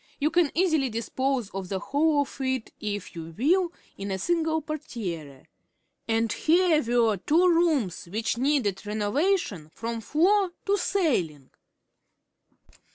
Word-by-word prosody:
You 300 +2 +1
can 345 -4 +3
easily 315 -6 +2
dispose 245 +1 -2
of 190 -1 -5
the 195 - -1
whole 290 +8 +2
of 280 - -6
it, 260 -3 -2
if 205 -2 -4
you 165 -1 -8
will, 345 +7 +2 0.3
in 200 0 -4
a 190 - -1
single 320 - 0
portière. 185 - -6 0.6
And 225 -1 +1
here 335 -1 +3
were 230 -4 +2
two 330 - +3
rooms 325 - +2
which 215 +7 -2
needed 245 -7 0
renovation 210 - 0
from 230 +6 -5
floor 365 - +2
to 405 - +3
ceiling! 240 - -1
260 Hz, 130 wpm, -26 LUFS, 205-320 Hz, 0.6 s, can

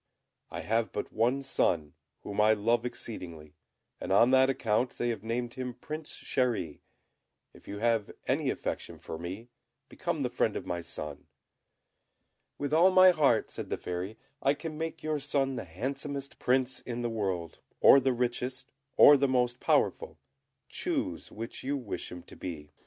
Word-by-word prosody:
I - - -5
have 115 +1 0
but 105 - -4
one 125 +5 +1
son, 80 - +1 0.3
whom 100 +1 -1
I 110 +1 +6
love 115 +3 +1
exceedingly, 85 -11 -8 0.5
and - - -5
on 115 +6 +6
that 130 0 +6
account 120 -1 0
they 120 - 0
have 115 -4 -2
named 120 +1 -2
him 125 -2 -5
Prince 155 0 -7
Chéri; 120 - -1 0.7
if - - -18
you 100 - -5
have 115 -1 +1 0.2
any - - +1
affection - - -4
for 80 - -7
me, 95 +8 -6 0.4
become - - -3
the - - -1
friend - - +1
of - - -4
my 85 -1 -3
son." 75 -3 -7 1.3
"With 145 +1 -3
all 170 +4 +7
my 185 0 +8
heart," 140 -9 +2
said - - -6
the - - -1
Fairy; 90 +5 -5 0.2
"I 140 - +3
can 155 +1 -6
make 160 +1 -4
your 155 -1 -1
son 135 -1 0
the 95 - -5
handsomest 135 - -5
Prince 130 0 +1
in 120 -1 -5
the - - +1
world, 95 -7 -3 0.2
or 140 - +8
the 135 0 +2
richest, 125 +2 -2 0.3
or 145 - +9
the 140 0 +2
most 125 -2 +1
powerful; - - +1 0.5
choose - - -3
which 115 +2 -6
you 140 +2 -1
wish 120 -7 -5
him 90 -1 -8
to - - -13
be." 75 -5 -7
120 Hz, 170 wpm, -30 LUFS, 100-135 Hz, 1.3 s, or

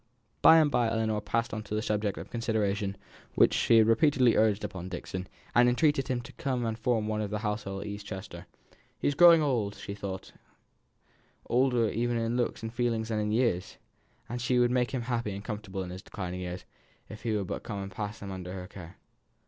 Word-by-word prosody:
By 165 - +9
and 155 -2 +4
by 120 -3 +2
Ellinor 110 -2 0
passed 115 +2 -1
on 110 - -3
to 105 +1 -3
a - - 0
subject 105 -2 -1
the - - -6
consideration 105 -4 -1 0.3
of - - -30
which - - +6
she 115 - +4
had 110 - +7
repeatedly 125 +1 +4
urged 110 -1 +3
upon 95 -3 -5
Dixon, 90 0 -5 0.3
and 120 0 +6
entreated 135 +1 +2
him 125 -2 -1
to - - -12
come 130 -3 -2
and 115 -1 -1
form 115 -1 0
one 110 0 -1
of 105 - -2
their 105 0 -3
household 105 -2 -3
at 100 - -6
East 100 0 -6
Chester. 95 -2 -8 0.5
He - - -6
was 145 - +2
growing 170 +1 +7
old, 115 -8 0
she 100 - -7
thought 95 -2 -6 1.1
older 125 -2 +2
even 120 +3 0
in 115 +1 -1
looks 120 -2 -1
and 115 0 -5
feelings 115 -2 -1
than 110 -1 0
in 105 0 -1
years, 110 -6 0 0.5
and 120 0 -4
she 125 +1 +1
would 120 0 +4
make 125 -1 +2
him 130 -3 -3
happy 115 -4 -2
and 100 - -7
comfortable 105 -3 -4
in 90 - -7
his 90 +1 -7
declining 90 -3 -6
years 90 0 -6 0.4
if 105 - -10
he 115 -2 -1
would 100 - -2
but - - -4
come 100 -2 -5
and 95 - -7
pass 105 +2 -5
them 100 -1 -7
under 90 -1 -6
her 90 -1 -6
care. 90 -1 -11
110 Hz, 220 wpm, -29 LUFS, 100-120 Hz, 1.1 s, By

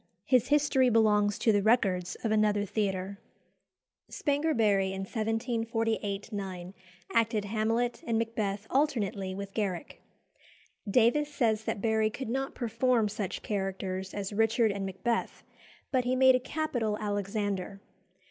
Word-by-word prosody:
His 250 -2 +3
history 285 -3 +3
belongs 210 -3 +3
to 225 - +3
the 205 -1 +3
records 195 -5 +1
of 225 - 0
another 210 -1 +2
theatre. 195 -1 -2 0.9
Spanger 290 0 0
Barry 195 -3 +2
in 190 - -4
1748 225 -1 -2
9 185 -2 -5 0.4
acted 225 -2 +2
Hamlet 225 +3 0
and 230 -1 +1
Macbeth 215 -3 -2
alternately 205 -9 0
with 200 0 -7
Garrick. 195 -5 -3 0.9
Davies 250 +7 +3
says 225 -6 0
that 200 - -2
Barry 220 -1 +2
could 240 +2 -6
not 270 +3 -2
perform 235 -1 +1
such 200 -2 -4
characters 190 -2 -3
as 205 0 -4
Richard 225 +1 +3
and 200 -1 -3
Macbeth, 230 +5 -2 0.5
but 255 -2 +2
he 250 +1 0
made 260 0 +6
a 255 - +3
capital 245 -7 -2
Alexander. 205 -2 -2
215 Hz, 130 wpm, -29 LUFS, 200-235 Hz, 0.9 s, made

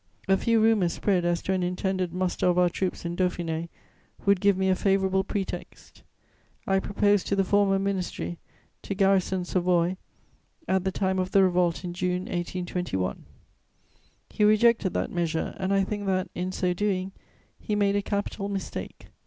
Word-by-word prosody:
A 195 - +5
few 230 +3 +2
rumours 215 -6 +3
spread 185 -4 +1
as 175 0 0
to 190 - 0
an 185 - 0
intended 180 0 -1
muster 180 0 -1
of 180 0 +2
our 180 -1 +4
troops 185 -1 -3
in 170 0 -3
Dauphiné 170 -2 -1 0.6
would 200 -2 +3
give 200 -2 +4
me 190 0 +1
a 190 - +3
favourable 190 0 +2
pretext. 195 0 -6 0.6
I 195 0 +2
proposed 205 0 +1
to 200 - +1
the 195 - +2
former 195 0 +3
ministry 190 -3 -3 0.4
to 200 - -4
garrison 190 -2 +2
Savoy 180 0 +1 0.7
at 190 0 +1
the 190 - +1
time 190 -1 0
of 185 0 -1
the 195 0 +5
revolt 180 -2 +1
in 175 -1 -4
June 180 0 -1
1821. 175 - -3 1.1
He 210 - 0
rejected 215 -1 +4
that - - -1
measure 165 -2 -1
and 190 +1 -1
I 195 0 +3
think 205 +1 -4
that, 185 -1 0
in 180 +1 -3
so 180 -1 0
doing, 190 -1 -1 0.5
he 210 - -2
made 200 -1 +2
a 205 - +2
capital 200 0 -3
mistake. 195 -1 -6
190 Hz, 170 wpm, -26 LUFS, 180-200 Hz, 1.1 s, A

